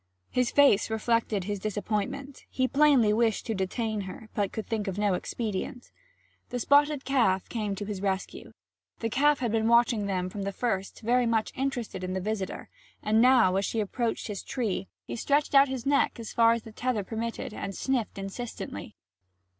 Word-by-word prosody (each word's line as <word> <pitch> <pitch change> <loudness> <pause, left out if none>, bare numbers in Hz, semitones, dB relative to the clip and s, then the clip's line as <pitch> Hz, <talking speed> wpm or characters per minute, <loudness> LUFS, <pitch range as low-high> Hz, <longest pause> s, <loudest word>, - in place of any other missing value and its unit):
His 250 -1 +1
face 280 -9 +4
reflected 220 -2 0
his 205 +1 -3
disappointment; 215 +7 -3
he 260 -1 0
plainly 275 -7 +4
wished 225 -1 +1
to 225 - -1
detain 215 +2 -2
her, 195 +3 -9
but 200 -2 0
could 220 - -5
think 220 -3 -2
of 195 0 -3
no 205 -2 +2
expedient. 230 +6 -4 0.6
The 250 - -3
spotted 285 +3 +3
calf 230 -9 +2
came 210 -4 -2
to 205 - -5
his 200 -2 -5
rescue. 195 -1 -3 0.5
The 225 -1 -3
calf 290 +3 +3
had 240 -3 0
been 220 0 +1
watching 235 -3 +3
them 185 -2 -1
from 200 +2 -6
the 200 0 -2
first, 195 -3 -2
very 245 +2 +2
much 225 -1 +1
interested 245 -8 -3
in 185 0 -3
the 190 - -1
visitor; 200 0 -3 0.4
and 215 +1 +3
now, 245 -7 +5
as 195 - +1
she 225 - -2
approached 225 +3 -2
his 205 -3 -4
tree, 215 -6 -2 0.2
he - - -5
stretched 285 +6 +1
out 275 0 +7
his 260 -3 -4
neck 280 -3 +2
as 225 - -7
far 230 0 +5
as 230 - -3
the 225 - -10
tether 240 -1 -1
permitted 225 +2 -4
and 195 -2 -5
sniffed 255 -7 -1
insistently. 195 +5 -6
225 Hz, 185 wpm, -28 LUFS, 200-250 Hz, 0.6 s, out